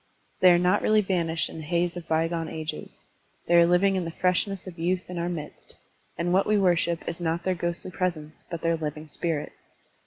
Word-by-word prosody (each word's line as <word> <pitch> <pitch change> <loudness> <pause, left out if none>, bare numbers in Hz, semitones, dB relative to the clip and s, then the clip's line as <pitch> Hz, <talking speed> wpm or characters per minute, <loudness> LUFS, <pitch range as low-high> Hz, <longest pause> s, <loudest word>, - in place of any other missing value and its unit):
They 185 - +7
are 175 - +6
not 180 +1 +2
really 215 0 +4
vanished 170 -4 0
in - - -9
the - - -6
haze 175 +2 0
of 175 -2 -7
bygone 165 0 0
ages; 160 -1 -6 0.4
they 175 - 0
are 170 0 +7
living 190 +3 +3
in 185 - 0
the 165 - -4
freshness 185 +3 0
of 180 -3 -9
youth 180 +2 -1
in 175 - -4
our 170 +1 -1
midst, 155 -4 -7 0.4
and 175 +1 0
what 190 +1 +3
we 210 0 +3
worship 175 -3 +1
is 170 +1 -4
not 170 +1 -1
their 185 - +1
ghostly 175 +1 -4
presence 170 -5 -3
but 170 -2 -5
their 165 0 +2
living 155 0 -5
spirit. 155 0 -3
170 Hz, 210 wpm, -26 LUFS, 165-180 Hz, 0.4 s, They